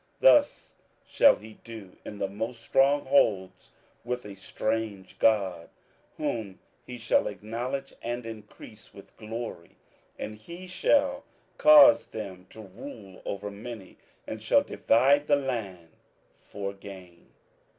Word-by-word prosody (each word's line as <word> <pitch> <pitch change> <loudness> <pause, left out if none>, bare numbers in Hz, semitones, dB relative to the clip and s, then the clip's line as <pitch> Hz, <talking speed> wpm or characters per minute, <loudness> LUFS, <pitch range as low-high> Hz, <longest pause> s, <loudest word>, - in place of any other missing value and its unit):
27:011:039 - - -36
Thus 295 -13 +4 0.3
shall 280 - +5
he 110 0 -14
do 110 -5 -10
in 105 - -8
the 100 - -1
most 115 +4 -6
strong 140 +2 +3
holds 105 -9 +1 0.3
with 125 0 -4
a 105 - -8
strange 105 0 -4
god, 100 -6 +2 0.5
whom 105 -5 -3 0.2
he 125 - -8
shall 115 -1 +1
acknowledge 120 +7 -5
and 120 0 -4
increase 110 -1 -12
with 100 - -15
glory: 110 -5 -7 0.4
and 105 0 -6
he 170 +12 -10
shall 275 +9 +1 0.4
cause 295 -1 +8
them 95 -4 -8
to 110 - -12
rule 95 -1 -11
over 100 +1 -4
many, 105 -1 -9 0.3
and - - -6
shall - - +3
divide 140 +5 +3
the 145 - +5
land 110 -11 -4 0.5
for 100 -1 -6
gain. 95 -3 -13
110 Hz, 130 wpm, -27 LUFS, 100-130 Hz, 0.5 s, cause